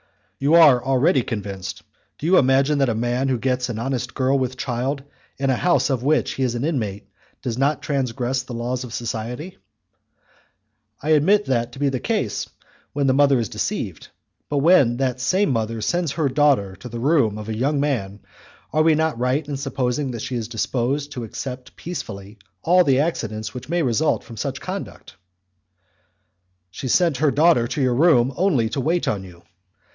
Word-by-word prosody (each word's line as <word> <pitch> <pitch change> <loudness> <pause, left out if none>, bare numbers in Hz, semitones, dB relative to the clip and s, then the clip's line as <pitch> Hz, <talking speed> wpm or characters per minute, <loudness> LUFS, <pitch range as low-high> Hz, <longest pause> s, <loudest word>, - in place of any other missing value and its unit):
"You 145 +4 +3
are 145 -8 +7
already 135 +3 +3
convinced. 100 -4 -5 0.3
Do - - -7
you 185 +3 +5
imagine 135 +2 +3
that 135 -2 +3
a 115 - 0
man 120 +3 0
who 130 -2 +1
gets 125 0 -1
an 115 - -4
honest 125 +1 -3
girl 135 +1 +2
with 130 0 -2
child 130 +2 -2 0.3
in 135 0 +1
a - - +2
house 175 -1 +2
of 130 -3 0
which 150 +4 +1
he - - -5
is 125 -2 0
an 120 +4 -2
inmate 110 -11 -3 0.4
does 120 -1 -3
not 140 +1 +1
transgress 130 -2 -1
the 125 -1 -8
laws 125 +2 -3
of 125 - -8
society?" 120 +9 -5 1.4
"I 150 - -2
admit 185 +8 +4
that 120 -2 -1
to 135 - -10
be 145 -1 +2
the 130 -2 -2
case 210 - -2 0.4
when 145 -1 0
the 130 - +3
mother 140 0 +4
is 115 -4 -2
deceived; - - -4 0.4
but 145 - -1
when 140 -6 +4
that 130 -1 -1
same 185 +9 +2
mother 115 -1 -1
sends 175 +5 0
her 155 -4 0
daughter 130 -9 +2
to 125 - -9
the 120 0 -6
room 125 -6 +2
of 105 0 -7
a 110 - -3
young 140 +5 0
man, 105 -9 -2 0.5
are 155 - +3
we 160 0 +4
not 160 -5 0
right 130 +4 0
in 145 - -3
supposing 135 0 -2
that 120 -3 -5
she 130 - -4
is 115 -2 -3
disposed 130 +5 -2
to 125 -4 -5
accept 125 +3 -7
peacefully 105 - -7 0.2
all 180 +2 +5
the 135 -5 +3
accidents 110 -9 -3
which 125 +2 -8
may 170 0 +1
result 135 +4 +1
from 115 - -11
such 130 +5 -3
conduct?" 190 +2 -7 1.6
"She 130 - -6
sent 165 +2 +2
her 150 +2 +3
daughter 140 -3 +3
to 140 - -3
your 130 -1 +2
room 130 -3 +4
only 165 - +2
to 135 - -2
wait 165 +5 0
on 100 -3 -1
you." 90 -2 -14
130 Hz, 190 wpm, -22 LUFS, 120-145 Hz, 1.6 s, are